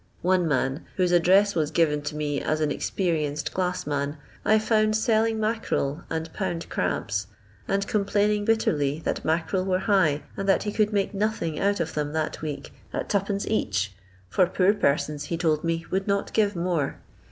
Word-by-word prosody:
One 180 -1 +3
man, 135 0 -1
whose 180 -2 +2
address 190 +4 +5
was 155 -3 0
given 150 -2 +2
to - - -9
me 145 -1 -1
as 155 - 0
an 155 -1 +1
experienced 155 -4 -1
glass 180 -1 -1
man, 145 +1 -2 0.3
I 215 - +4
found 215 0 +2
selling 220 0 +2
mackarel 215 -9 -1
and 160 0 -4
"pound 175 -4 -3
crabs," - - -1 0.4
and 200 0 0
complaining 205 0 +1
bitterly 155 -10 +1
that - - -1
mackarel 165 +4 0
were 185 -1 +1
high, 160 -9 +3
and 195 0 -2
that 195 - +3
he 210 - -2
could 215 0 +1
make 200 -1 0
nothing 200 -6 -1
out 200 0 +1
of 165 -1 -2
them 150 0 -2
that 160 -1 -2
week 150 -2 -5 0.2
at - - -4
2d, 200 0 0
each, 100 - 0 0.3
for 180 - +3
poor 185 +2 +3
persons, 150 -5 0
he 170 - -2
told 160 -2 +1
me, 165 0 -1
would 190 +1 0
not 200 0 0
give 210 -2 +2
more. 170 -4 -1
175 Hz, 175 wpm, -26 LUFS, 150-200 Hz, 0.4 s, address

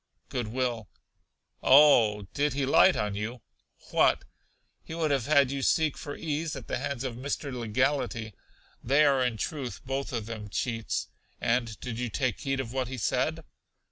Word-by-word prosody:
Good 120 -3 -2
will. 120 -3 -2 0.7
Oh, 125 -7 +6
did 145 0 +1
he 140 0 0
light 180 +7 +6
on 105 -1 -1
you? 110 +3 -5 0.5
What! - - +3 0.6
He 160 - -8
would 160 -3 0
have 135 -3 0
had 140 -3 +4
you 140 0 -2
seek 155 +2 +2
for 145 - -7
ease 160 0 -3
at - - -8
the - - -2
hands 140 -3 -3
of 125 -3 -4
Mr. 140 +1 -3
Legality. 120 -1 -1 0.5
They 140 +5 +4
are, 135 -3 +3
in 125 -3 -1
truth, 135 - -4
both 135 +1 -3
of 115 -4 -3
them 110 -2 -7
cheats. 115 +2 -2 0.3
And 115 -2 0
did 115 -2 -5
you 125 -1 -2
take 125 0 -1
heed 135 -2 -2
of 125 -2 -4
what 130 -2 -1
he 130 +1 -6
said? 110 - 0
130 Hz, 175 wpm, -28 LUFS, 115-140 Hz, 0.7 s, Oh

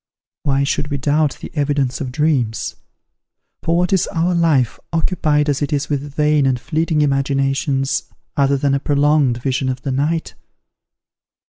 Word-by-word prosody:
Why 140 -1 +1
should 145 +1 -1
we 145 -1 -2
doubt 145 +1 +1
the - - -7
evidence 140 -4 0
of 130 -3 -3
dreams? 130 -6 0 0.9
for 165 +1 +1
what 180 +1 +1
is 190 - +2
our 170 +2 0
life, 160 -8 +2
occupied 155 -3 +1
as 145 -1 0
it 145 - -1
is 145 -1 -1
with 145 -1 -3
vain 150 -2 +3
and 130 -2 +1
fleeting 160 +2 0
imaginations, 135 0 0 0.3
other 140 0 +2
than 140 0 +1
a 140 - +2
prolonged 145 -3 +2
vision 130 -1 0
of 130 0 -4
the 135 - -2
night? 150 +5 -1
145 Hz, 155 wpm, -19 LUFS, 135-155 Hz, 0.9 s, vain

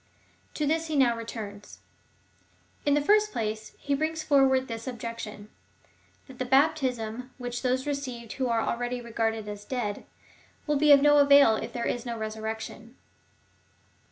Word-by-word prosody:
To 300 - -1
this 320 +2 0
he 310 - -3
now 250 -4 +4
returns. 220 -3 -8 1.1
In 285 - +4
the 290 - +1
first 425 +5 +4
place 215 - -4
he 285 - -2
brings 315 +2 -1
forward 270 -3 +3
this 230 0 -6
objection 230 -3 -7 0.4
— - - -35
that 265 -2 -13
the - - 0
bap 275 +5 +4
tism 250 -3 -3
which 245 -1 -5
those 260 +1 0
received 255 -5 -4
who 260 -1 -1
are 230 -1 +1
already 245 +1 -2
regarded 225 -2 -2
as 205 0 -7
dead, 210 -3 -4 0.6
wull 295 -1 +1
be 300 +1 +5
of 280 -1 +7
no 295 0 +6
avail 280 -5 +7
if - - -5
there 235 -1 -3
is 245 - -2
no 235 -2 -4
resurrection. 220 +2 -6
245 Hz, 160 wpm, -27 LUFS, 225-280 Hz, 1.1 s, of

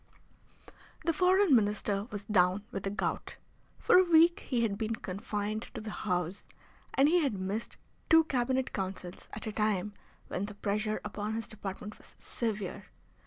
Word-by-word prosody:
The 330 - +3
Foreign 370 -1 +5
Minister 205 -2 +1
was 205 -3 -6
down 185 -1 +3
with 195 - -3
the 195 - -2
gout. 205 - -3 0.4
For 360 - +6
a - - +6
week 340 0 +5
he 240 -3 -1
had 210 -3 +1
been 220 +1 -2
confined 210 +2 -4
to - - -3
the 215 0 -6
house, 180 0 -2 0.5
and 270 +2 +5
he 350 +3 +4
had 280 -10 +1
missed 195 +4 -4 0.3
two 325 0 +8
Cabinet 260 -2 0
Councils 185 -2 -5
at 215 - -6
a 215 - -2
time 210 -1 0 0.3
when 185 - -2
the 205 0 -8
pressure 210 +1 -1
upon 210 +1 -3
his 225 - -3
department 210 0 -7
was - - -14
severe. 215 -5 -4
215 Hz, 165 wpm, -31 LUFS, 200-250 Hz, 0.5 s, two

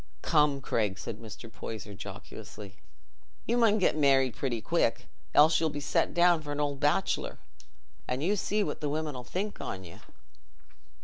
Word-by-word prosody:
"Come, 150 -3 +3
Craig," 105 -7 0
said - - -6
Mr. 115 +1 -9
Poyser 110 -2 -7
jocosely, 100 +1 -9 0.7
"you 235 - +1
mun 225 -3 +4
get 190 - +2
married 135 -5 +4
pretty 125 -4 -1
quick, - - +1 0.3
else 155 +2 +7
you'll 160 - +1
be 145 -1 -4
set 145 - +1
down 175 -1 +5
for 145 -1 -6
an 145 - -3
old 145 -2 -1
bachelor; 145 +7 +1 0.7
an' 125 +2 -2
you 190 +7 +2
see 210 +1 0
what - - -4
the 150 - -1
women 155 -1 -2
'ull 125 - -6
think 195 +11 -4
on 95 0 -5
you." 85 -2 -12
145 Hz, 170 wpm, -29 LUFS, 115-165 Hz, 0.7 s, else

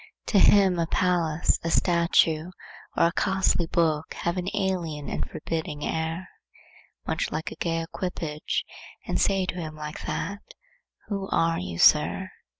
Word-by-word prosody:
To 205 - +4
him 190 -3 +5
a 165 - +1
palace, 170 -3 +1
a 165 - -1
statue, 170 -1 +3 0.5
or - - +5
a 170 - +3
costly 190 -2 +1
book 160 -2 0
have 170 +1 -2
an 180 0 -3
alien 175 -7 -2
and - - -3
forbidding 155 -2 -4
air, 160 +3 -2 0.8
much - - -1
like 155 +1 -3
a - - -7
gay 165 -1 -1
equipage, 165 -3 -3 0.4
and - - 0
seem 195 -2 +2
to 180 - -4
say 160 -2 -4
like 155 0 -7
that, 200 0 -3 0.7
'Who 195 -2 -3
are 165 0 +2
you, 90 -1 -5
Sir? - - +4
170 Hz, 150 wpm, -26 LUFS, 155-185 Hz, 0.8 s, him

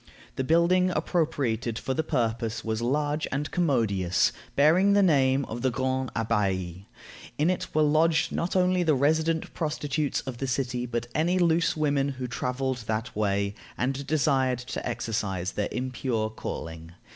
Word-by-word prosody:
The 130 - -1
building 170 +5 +3
appropriated 130 - -1
for 130 - -2
the 160 - 0
purpose 115 -6 -1
was 110 0 -1
large 145 +5 0
and 145 +2 -2
commodious, 110 - +2 0.2
bearing 175 +8 +5
the 200 0 +5
name 135 -5 +3
of 115 +2 -6
the 130 - +2
Grand 130 +1 -1
Abbaye. 95 -5 -1 0.5
In 155 +5 +3
it 185 - -3
were 155 - +4
lodged 155 +2 +3
not 170 +3 -2
only 185 0 +3
the 160 -4 +3
resident 160 +4 +1
prostitutes 150 -2 -1
of 130 -3 -7
the 135 - -2
city, 125 -1 -1
but 120 0 -2
any 170 +4 +1
loose 170 -2 +2
women 145 -2 +1
who 130 -2 -5
traveled 125 +1 -2
that 110 +2 -2
way, 100 -1 0 0.2
and 135 +2 -2
desired 135 -4 +2 0.2
to - - -3
exercise 100 -6 -2
their 105 - -2
impure 125 -3 -2
calling. 80 -5 -7
130 Hz, 155 wpm, -27 LUFS, 115-155 Hz, 0.5 s, bearing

